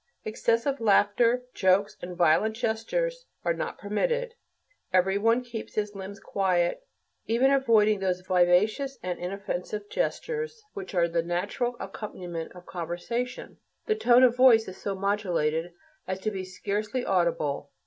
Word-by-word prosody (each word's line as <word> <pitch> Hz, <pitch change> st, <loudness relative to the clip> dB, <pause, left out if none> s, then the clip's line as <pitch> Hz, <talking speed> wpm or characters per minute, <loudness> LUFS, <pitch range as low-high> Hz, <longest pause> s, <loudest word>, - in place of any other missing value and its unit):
Excessive 230 Hz, +5 st, 0 dB
laughter, 225 Hz, +3 st, +3 dB
jokes, 195 Hz, +2 st, +2 dB
and 175 Hz, 0 st, -7 dB
violent 175 Hz, +6 st, +3 dB
gestures -, -, -2 dB, 0.2 s
are -, -, +2 dB
not -, -, -4 dB
permitted. 475 Hz, -, -1 dB, 0.6 s
Every 190 Hz, +2 st, +3 dB
one 230 Hz, +4 st, +3 dB
keeps 235 Hz, -2 st, -7 dB
his 210 Hz, -1 st, -1 dB
limbs 195 Hz, 0 st, -8 dB
quiet, 185 Hz, -, 0 dB, 0.5 s
even 245 Hz, +4 st, +3 dB
avoiding 220 Hz, -6 st, +4 dB
those 185 Hz, -1 st, -1 dB
vivacious 185 Hz, +9 st, +2 dB
and 180 Hz, -1 st, -3 dB
inoffensive 200 Hz, +2 st, -4 dB
gestures 465 Hz, -2 st, -3 dB
which 195 Hz, 0 st, -7 dB
are 170 Hz, -1 st, +3 dB
the 170 Hz, 0 st, 0 dB
natural 195 Hz, +9 st, -2 dB
accompaniment 175 Hz, -6 st, -6 dB
of 180 Hz, 0 st, -12 dB
conversation; 180 Hz, +9 st, -4 dB, 0.3 s
the 435 Hz, -, +2 dB
tone 250 Hz, -, +5 dB
of 245 Hz, -2 st, +5 dB
voice 250 Hz, -3 st, +6 dB
is 185 Hz, 0 st, -8 dB
so 200 Hz, -1 st, -3 dB
modulated 175 Hz, -5 st, 0 dB, 0.4 s
as 190 Hz, 0 st, -3 dB
to 215 Hz, -, -1 dB
be 190 Hz, -2 st, -4 dB
scarcely 210 Hz, +6 st, -3 dB
audible. 165 Hz, -6 st, 0 dB
205 Hz, 140 wpm, -27 LUFS, 180-240 Hz, 0.6 s, voice